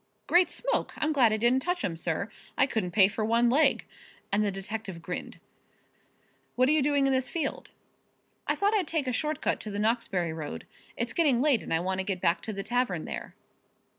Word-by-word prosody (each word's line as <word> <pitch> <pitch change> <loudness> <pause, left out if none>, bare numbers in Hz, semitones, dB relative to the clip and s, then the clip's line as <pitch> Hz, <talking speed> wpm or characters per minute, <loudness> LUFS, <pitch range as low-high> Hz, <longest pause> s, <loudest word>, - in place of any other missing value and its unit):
"Great 355 +1 +4
smoke! - - -2
I'm 310 0 0
glad 250 -6 +4
I 215 - +1
didn't 240 +4 +3
touch 355 +3 -1
'em, 170 - -2
sir. 165 +4 -2 0.3
I 265 - +5
couldn't 220 -9 -2
pay 190 +2 +5
for 215 +2 -3
one 235 +2 +3
leg," 295 +5 +3 0.5
and 205 +1 +2
the 205 - +1
detective 195 -1 -6
grinned. 180 +2 -6 1.2
"What 255 +1 +3
are - - +4
you 310 -1 +3
doing 285 0 +2
in 270 - +2
this 260 -1 0
field?" 335 - -3 0.8
"I - - +2
thought 405 +2 +1
I'd 390 -6 +1
take 315 -4 -1
a 255 - -1
short 305 +4 -1
cut - - 0
to 215 - -7
the 200 - -4
Knoxbury 205 -6 0
road. 150 - -6 0.3
It's 235 0 -1
getting 290 -8 +3
late 275 -4 +3
and - - -8
I 165 - +2
want 190 +1 -2
to - - 0
get 190 -1 -3
back 175 0 +1
to 220 - -5
the 195 -1 -5
tavern 220 -7 -1
there." - - -6
230 Hz, 215 wpm, -28 LUFS, 190-280 Hz, 1.2 s, I